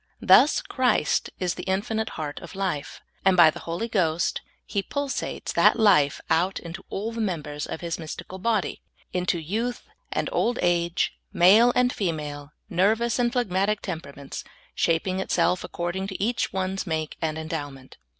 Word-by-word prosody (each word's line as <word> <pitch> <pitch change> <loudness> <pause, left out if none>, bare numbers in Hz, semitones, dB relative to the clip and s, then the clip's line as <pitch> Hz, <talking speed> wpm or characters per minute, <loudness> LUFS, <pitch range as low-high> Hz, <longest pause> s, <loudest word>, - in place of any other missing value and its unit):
Thus 295 - +6
Christ 250 - +1
is 180 -1 0
the 180 - -7
infinite 215 +3 -1
heart 150 -2 -4
of 170 - -11
life, 165 -8 -3 0.2
and 190 -1 +4
by 165 -3 +8
the - - -9
Holy 170 +7 -3
Ghost 170 -7 0 0.2
He 200 - -1
pulsates 285 +6 -3
that - - +5
life 185 -11 +4
out 175 +4 +2
into 170 +1 -8
all 215 +4 -3
the 230 0 -4
members 150 -7 -3
of - - -5
His 170 -1 -3
mystical 165 +3 -7
bodj^ 215 -1 0 0.2
— - - -34
into 180 -1 0
youth 225 +10 -3 0.3
and - - -1
old 245 +1 +1
age, 175 0 +1 0.2
male 210 +8 +6
and 250 0 +3
female, 150 -6 -3 0.2
nervous 220 +7 +2
and 240 -1 +2
phlegmatic 210 -4 0
temperaments 140 -6 -6 0.2
— - - -28
shaping 180 +3 +1
itself 180 -1 +1
according 175 +3 -3
to 190 - -6
each 235 +4 0
one's 190 +1 -2
make 160 -2 -2
and 160 -1 -1
endowment. 145 -5 -6
185 Hz, 160 wpm, -25 LUFS, 160-215 Hz, 0.3 s, by